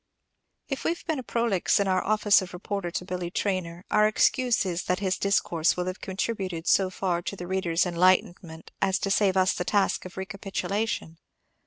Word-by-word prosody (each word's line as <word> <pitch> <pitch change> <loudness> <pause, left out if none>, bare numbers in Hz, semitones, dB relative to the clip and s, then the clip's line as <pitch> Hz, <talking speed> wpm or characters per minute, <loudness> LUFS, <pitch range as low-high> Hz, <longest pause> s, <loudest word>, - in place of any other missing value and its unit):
If 275 - -4
we - - +1
have - - -16
been 315 -5 -1
prolix 230 -7 +1
in 200 - +1
our 185 -1 +1
office 210 -1 +4
of 180 -1 -8
reporter 190 0 -4
to 180 - -4
Billy 180 -1 -4
Traynor, 180 -2 -3
our 210 0 +5
excuse 245 +2 +2
is 180 -1 -3
that 180 - 0
his 190 -2 0
discourse 175 -5 +1
will 180 - -1
have 185 +1 -5
contributed 190 -3 -3
so 190 -1 +3
far 180 -2 -1
to 195 - -5
the 180 - -7
reader's 180 -2 0
enlightenment 175 -2 +1
as 190 0 +2
to 195 - -2
save 195 -1 +3
us 185 0 +3
the - - -3
task 195 +2 +1
of 185 - -10
recapitulation. 195 -2 -3
190 Hz, 185 wpm, -26 LUFS, 180-200 Hz, -, our